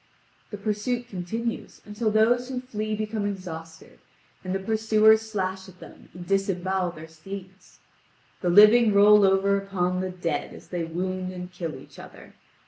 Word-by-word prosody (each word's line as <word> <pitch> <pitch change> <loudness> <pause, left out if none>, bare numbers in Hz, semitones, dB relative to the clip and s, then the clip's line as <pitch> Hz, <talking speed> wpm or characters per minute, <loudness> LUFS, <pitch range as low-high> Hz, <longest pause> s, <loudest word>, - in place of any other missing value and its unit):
The 210 - -6
pursuit 220 +4 -2
continues 225 +4 -5
until 215 +2 -2
those 240 +4 +2
who 255 -1 -3
flee 215 -4 -4
become 215 0 -3
exhausted, 165 -5 -8 0.4
and 185 0 -3
the - - -1
pursuers 220 +1 +3
slash 190 -2 -3
at 185 -1 -18
them - - -14
and 180 0 -9
disembowel 190 -1 0
their 155 0 -10
steeds. 190 +4 -11 0.6
The 180 - 0
living 210 +3 +6
roll 205 +1 +7
over 195 +1 +3
upon 185 -2 -2
the 185 - -3
dead 170 -5 -4
as - - -15
they 175 -2 -3
wound 185 +2 -3
and 180 0 -8
kill 170 -4 -5
each - - -14
other. - - -13
195 Hz, 155 wpm, -25 LUFS, 180-215 Hz, 0.6 s, roll